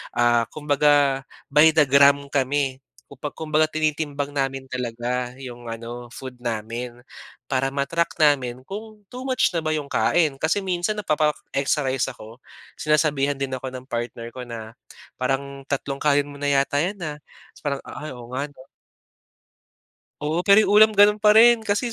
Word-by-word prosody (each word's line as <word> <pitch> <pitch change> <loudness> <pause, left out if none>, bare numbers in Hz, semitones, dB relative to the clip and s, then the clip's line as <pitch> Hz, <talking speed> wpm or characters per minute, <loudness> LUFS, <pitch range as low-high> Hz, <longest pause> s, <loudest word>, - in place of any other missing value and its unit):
ah, 120 -1 +3
kumbaga 145 -2 +2 0.3
by 150 +3 +7
the 150 - +6
gram 140 +1 +5
kami. 135 -1 0 0.3
Kumba 140 +1 -7
kumbaga 155 0 +1
tinitimbang 150 -2 -1
namin 135 -1 -2
talaga 125 0 -3
'yong 120 -2 -9
ano 120 +1 -7
food 130 -1 -9
namin 120 +1 -5 0.5
para 135 0 0
ma-track 145 +5 -1
namin 130 -5 +2
kung 215 +1 -8
too 250 +1 -7
much 255 -6 +2
na - - +2
ba 155 - 0
'yong 150 -2 -4
kain. 160 -5 +2
Kasi 160 +7 +1
minsan 185 +3 -1
napapa-extra 150 -4 0
rice 130 0 -1
ako, 115 0 -13 0.4
sinasabihan 150 -2 +1
din 135 -1 -3
ako 130 +1 -6
ng 130 +1 -9
partner 120 -1 -4
ko 130 - -6
na 115 -1 -8 0.4
"Parang 135 +2 -2
tatlong 140 0 -3
kanin 145 -1 +2
mo 145 - -10
na 145 0 +1
yata 140 +1 +2
'yan 195 +3 -3
ah," 150 -2 -4 0.4
tas - - -19
parang, 140 -2 -1
"Ay, 150 +1 -7
oo 120 0 -11
nga 140 +3 -2
'no." 130 -2 -16 1.6
Oo, 155 +3 0
pero 200 +3 +6
'yong - - 0
ulam 215 +1 +7
gano'n 210 +1 +6
pa 210 0 +5
rin, 235 +1 +7
kasi 220 +3 -1
140 Hz, 160 wpm, -23 LUFS, 130-155 Hz, 1.6 s, by